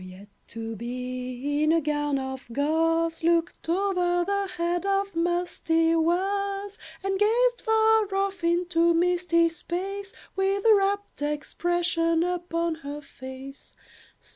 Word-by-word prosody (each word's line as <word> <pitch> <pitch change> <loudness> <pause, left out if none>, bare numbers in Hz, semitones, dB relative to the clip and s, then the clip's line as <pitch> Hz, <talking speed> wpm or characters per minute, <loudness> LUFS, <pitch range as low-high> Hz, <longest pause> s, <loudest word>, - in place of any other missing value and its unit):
The 185 - -10
Yet 190 +3 -13 0.2
to 225 0 -6
be, 255 +4 -4
in 305 +1 +3
a 330 - +4
gown 295 -2 0
of 265 -1 -5
gauze, 325 +4 +1
Looked 335 0 +1
over 355 -1 +1
the 400 +1 0
head 345 +1 0
of 395 0 0
musty 330 -1 +1
Was, 395 +4 0 0.2
And 390 0 -1
gazed 480 +4 +3
far 440 -2 +3
off 390 -2 -1
into 340 0 +2
misty 345 -1 +3
space 385 +4 -5 0.2
With 390 +2 0
a 450 - +8
wrapt 405 -3 0
expression 330 +2 0
upon 340 -1 -1
her 290 +1 -6
face. 270 0 -11
340 Hz, 125 wpm, -26 LUFS, 300-390 Hz, 0.2 s, a